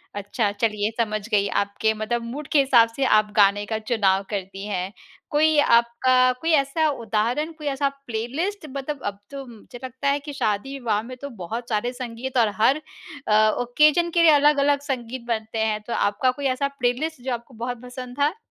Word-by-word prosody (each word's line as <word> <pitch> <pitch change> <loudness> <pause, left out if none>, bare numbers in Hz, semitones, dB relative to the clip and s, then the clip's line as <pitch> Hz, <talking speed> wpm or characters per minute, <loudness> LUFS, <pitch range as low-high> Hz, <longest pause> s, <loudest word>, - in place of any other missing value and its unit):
अच्छा, 205 +1 -1
चलिए, 210 0 0
समझ 215 -2 -1
गई। 205 -2 +2
आपके 200 +2 0
मतलब 220 +2 -2
मूड 270 +5 -6
के 295 - +5
हिसाब 245 -4 +5
से 275 - 0
आप 215 -3 +3
गाने 205 0 +4
का 220 +1 -2
चुनाव 205 -4 +1
करती 195 -1 -5
हैं। 190 -2 -3 0.4
कोई 310 +1 +3
आपका 255 +1 +4
कोई 330 - 0
ऐसा 290 +3 +1
उदाहरण, 235 +4 -1
कोई 305 -2 -8
ऐसा 280 0 0 0.2
प्लेलिस्ट, 285 - -3
मतलब 275 +1 -5
अब 200 0 -3
तो 275 -1 -7
मुझे 240 0 -13
लगता 260 +2 -4
है 280 - +1
कि 290 0 -8
शादी-विवाह 225 -2 -1
में 255 +2 -8
तो 280 - -5
बहुत 230 +7 -5
सारे 225 +2 0
संगीत 250 +1 -5
और 225 -3 +4
हर 275 +7 +4 0.5
अ, 215 0 +5
ओकेज़न 300 +7 +3
के 340 - +3
लिए 330 -2 +7
अलग-अलग 290 -1 +4
संगीत 260 -3 -4
बनते 220 -1 -2
हैं। 215 -1 -1
तो 235 - -3
आपका 255 +6 +1
कोई 280 +2 -7
ऐसा 280 +2 0
प्लेलिस्ट, 250 +5 -1
जो 255 0 -2
आपको 235 +2 -7
बहुत 245 -1 -5
पसंद 250 0 -9
था? 295 +5 +2
245 Hz, 185 wpm, -23 LUFS, 215-280 Hz, 0.5 s, लिए